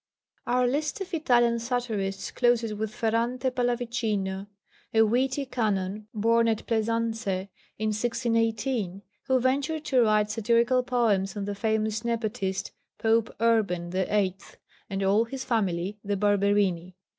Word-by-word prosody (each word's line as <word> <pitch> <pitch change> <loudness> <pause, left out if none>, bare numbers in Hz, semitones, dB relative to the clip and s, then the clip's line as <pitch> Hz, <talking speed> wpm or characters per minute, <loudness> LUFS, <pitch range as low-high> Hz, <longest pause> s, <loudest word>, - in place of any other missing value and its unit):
_ - - -1
Our 250 0 +3
list 290 +7 -1
of 385 -1 -6
Italian 240 -7 +3
satirists 225 -5 -2
closes 240 -3 +2
with 215 0 -3
Ferrante 240 +3 0
Pallavicino, 230 -6 -1 0.5
a 225 - +7
witty 260 +5 +1
Canon, 210 -4 -2
born 230 +2 +2
at 220 -2 0
Plaisance 230 0 -1
in 190 0 -2 0.4
1618, 225 -2 -1 0.2
who 260 -1 +3
ventured 280 +5 0
to 255 -3 +3
write 215 -2 +3
satirical 235 +3 +2
poems 220 -6 +1
on 200 - -2
the 205 - -3
famous 220 +1 0
nepotist, 210 -5 -2 0.3
Pope 225 0 +2
Urban 200 -7 +1
VIII., 190 0 0 0.5
and 195 0 -2
all 205 +4 +3
his 265 +2 -6
family, 200 -4 -1
the 205 0 -1
Barberini. 200 -3 +1
225 Hz, 130 wpm, -27 LUFS, 200-240 Hz, 0.5 s, a